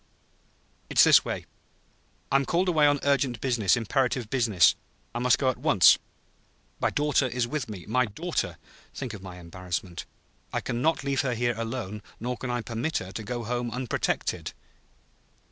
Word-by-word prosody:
"It's - - +6
this - - +7
way; - - -4 0.9
I'm 135 0 +4
called 180 +2 +1
away 155 -4 +4
on 145 -1 +3
urgent 135 -4 +1
business 120 -7 +2
imperative 125 0 0
business. 110 -11 +4 0.4
I 120 - -3
must 125 0 +4
go 130 -2 +2
at - - -11
once. - - +6 0.8
My - - +2
daughter 145 -2 +1
is 120 -1 -1
with 135 -2 -3
me. 95 -5 -7
My 125 +3 +1
daughter! 105 - -3 0.4
Think 130 -5 -5
of 105 - -8
my 95 -2 -9
embarrassment; 90 0 -5 0.4
I - - 0
can 120 0 -3
not 160 0 +1
leave 140 -1 +1
her 125 -3 -1
here, 120 +1 +1
alone, 115 -2 -4 0.2
nor 125 +2 -2
can 130 - -6
I 120 0 -1
permit 115 +8 -2
her 95 0 -5
to 105 - -5
go 120 +2 -4
home 120 +1 -2
unprotected." 125 +1 -2
120 Hz, 165 wpm, -27 LUFS, 105-135 Hz, 0.9 s, this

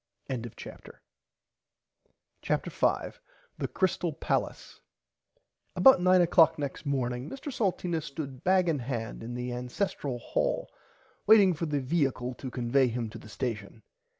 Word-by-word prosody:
[Pg 120 -3 -4
45] - - -12 1.4
CHAPTER - - -1
5 - - -1 0.4
THE - - -1
CRYSTAL 180 -3 0
PALACE - - -3 0.9
About 265 -9 +7
9 185 0 +5
oclock 170 -1 +5
next 145 +1 -5
morning 125 -1 -1
Mr 275 +1 -7
Salteena 180 -6 -1
stood 140 -2 -7
bag 185 -1 +3
in 155 -4 +1
hand 120 -2 -4
in 120 +2 -6
the 125 0 -4
ancestle 125 +2 -3
hall 120 - -2 0.6
waiting 205 -4 +7
for 165 +1 -3
the 145 -1 0
viacle 130 -3 -1
to 130 - -5
convay 125 +1 +2
him 115 -2 -3
to - - -9
the 110 - -13
station. 110 -3 -5
140 Hz, 135 wpm, -29 LUFS, 125-175 Hz, 1.4 s, About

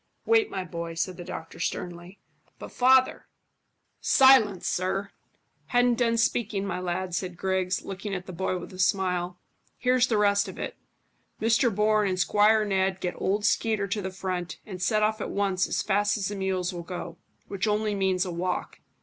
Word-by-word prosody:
"Wait, 450 -2 +3
my 190 -1 -3
boy," 170 -1 -6
said 180 +2 -2
the 175 - -8
doctor 165 -2 -8
sternly. 175 +2 -5 0.4
"But, - - -9
father 260 +1 +3 0.4
" - - -48 0.2
"Silence, 255 -8 +6
sir!" 195 +2 -1 0.6
"Hadn't 245 -1 +2
done 230 -1 +2
speaking, 220 -3 0
my 180 -2 -3
lad," 180 0 -3
said 180 0 -3
Griggs, 185 -1 -1
looking 195 +1 -5
at 180 -1 -5
the 185 - -8
boy 185 +1 -1
with 180 - -9
a 185 - -11
smile. 180 -1 0 0.4
"Here's 250 0 +3
the 225 - +1
rest 200 -1 +3
of - - -8
it. - - -5 0.6
Mr 230 +3 +3
Bourne 210 +1 +2
and 185 -1 -2
Squire 210 +4 +4
Ned 190 -1 0
get 180 -1 -2
old 205 +2 -1
Skeeter 215 -1 +1
to 205 +2 -1
the 190 - -3
front; 185 -2 -4
and 185 -3 -8
set 215 +4 +2
off 215 0 0
at - - -3
once 195 -2 0
as - - -1
fast 205 +1 +1
as 200 -2 -2
the 205 - -4
mules 190 -1 -1
will 175 - -5
go, 175 -1 -7 0.3
which 200 +2 -2
only 210 0 +1
means 190 -2 +1
a 180 - -4
walk." 180 +2 -3
195 Hz, 185 wpm, -27 LUFS, 180-215 Hz, 0.6 s, Silence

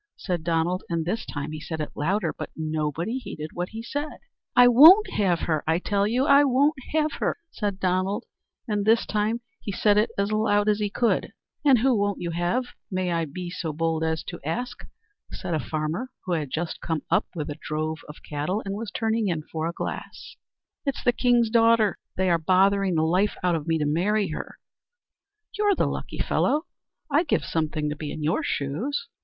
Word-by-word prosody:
said 175 -4 -3
Donald; 170 +2 0
and 165 -2 -1
this 220 +6 -2
time 145 0 -4
he 155 - -5
said 160 +1 -5
it 150 - -3
louder; 170 +2 0
but - - -6
nobody 160 - -2
heeded 155 -10 -7
what 175 +1 -3
he 225 +1 -7
said. 290 +5 -4 0.4
"I 245 0 +8
won't 320 - +8
have 185 -5 +1
her, 155 -3 0
I 160 +1 +3
tell 200 +2 0
you; 250 +5 +1
I 280 -1 +6
won't 280 +3 +3 0.2
have 310 -1 +2
her!" - - 0
said 205 -3 -3
Donald; 190 +4 0 0.4
and 210 -2 0
this 225 +2 +4
time 215 +3 0 0.2
he 205 - -5
said 205 +2 +3
it 215 - +2
as 200 +1 0
loud 215 -1 +2
as 210 0 +3
he 205 -1 0
could. 235 +3 0 0.3
"And 275 -4 +6
who 255 +2 +3
won't 205 -1 0
you 170 -1 -3
have, 175 +9 0 0.3
may 185 -2 -1
I 165 -1 0
be 175 +4 -6
so 170 -3 -3
bold 160 +1 0
as 160 -1 -1
to 175 - -7
ask?" 245 - -4 0.5
said 175 - -4
a 155 - +1
farmer, 155 - -3 0.2
who 185 - -3
had 155 -5 -1
just 160 +4 -3
come 160 -3 -2
up - - +3
with 150 -3 -3
a 145 - -8
drove 155 +1 -3
of 150 - -11
cattle, 155 +9 -2
and 195 - -3
was 215 +1 -4
turning 225 0 0
in 165 -4 -1
for 160 0 -2
a - - -1
glass. - - -6 0.5
"It's 275 -3 -2
the 245 - +3
king's 240 -2 +3
daughter. 230 -3 +4 0.2
They 185 -1 +2
are 170 - +3
bothering 190 +2 +3
the 155 - +2
life 185 +6 +2
out 180 -1 +3
of 160 -1 -2
me 165 0 +2
to 150 - 0
marry 195 +7 +1
her." 155 - -6 1.0
"You're 410 -1 +3
the - - +1
lucky - - -4
fellow. 305 +3 +1 0.5
I'd 315 +4 +3
give - - +1
something 155 -1 -1
to - - -3
be 150 -1 -5
in 155 - -5
your 155 +3 +1
shoes." 195 - -2
185 Hz, 205 wpm, -25 LUFS, 160-225 Hz, 1.0 s, I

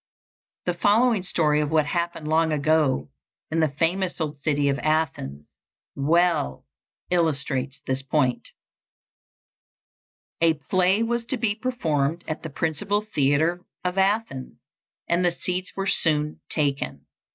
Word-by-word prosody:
The 180 - +1
following 210 +4 +3
story 150 -4 +1
of 150 - -1
what 155 -1 +3
happened 170 0 -2
long 160 +1 +2
ago 145 - +1 0.4
in 165 - +1
the 160 - +4
famous 170 +6 -1
old 150 -3 -3
city 145 -1 +1
of 140 0 +1
Athens 135 - -1 0.5
well 155 - +1 0.5
illustrates 140 -6 0
this 130 0 -1
point: 135 -2 0 1.9
A 165 -1 +4
play 185 +7 +2
was 235 +1 -1
to 260 +2 -1
be 225 -3 +1
performed 170 - -1
at 155 - -4
the 160 - -6
principal 160 +8 -1
theatre 155 +6 +2 0.2
of 180 +1 -1
Athens, 195 - 0 0.5
and 170 +1 +2
the 175 - +3
seats 180 +1 -3
were 195 - -2
soon 150 -5 +2
taken. 140 -3 -1
160 Hz, 130 wpm, -24 LUFS, 145-180 Hz, 1.9 s, the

